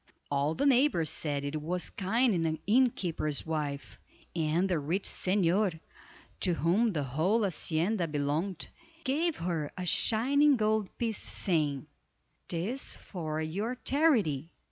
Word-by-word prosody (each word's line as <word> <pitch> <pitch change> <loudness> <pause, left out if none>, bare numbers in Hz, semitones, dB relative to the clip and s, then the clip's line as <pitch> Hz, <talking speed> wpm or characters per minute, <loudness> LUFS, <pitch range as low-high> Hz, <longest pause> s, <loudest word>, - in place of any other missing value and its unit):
All 145 +3 +1
the 280 - 0
neighbors 255 - +3
said 145 -3 -1
it 150 +2 -3
was 175 +3 -2
kind 225 +5 +1
in 175 - 0
the 160 -1 -1
innkeeper's 190 - +1
wife, 150 -3 -4 0.4
and 165 +3 +1
the 180 -4 0
rich 170 +7 -1
señor, 185 -1 +1 0.6
to 180 -3 +1
whom 185 - +2
the 150 -6 -1
whole 165 - +1
hacienda 175 +1 0
belonged, 150 +5 -2 0.4
gave 305 +4 0
her 165 -4 -2
a 180 - -3
shining 270 - +4
gold 215 -2 +1
piece, 225 -3 -1
saying: 150 -6 0 0.6
"'Tis 195 +11 -2
for 155 -4 -5
your 200 +10 -2
charity." 220 - +2
180 Hz, 130 wpm, -30 LUFS, 155-220 Hz, 0.6 s, shining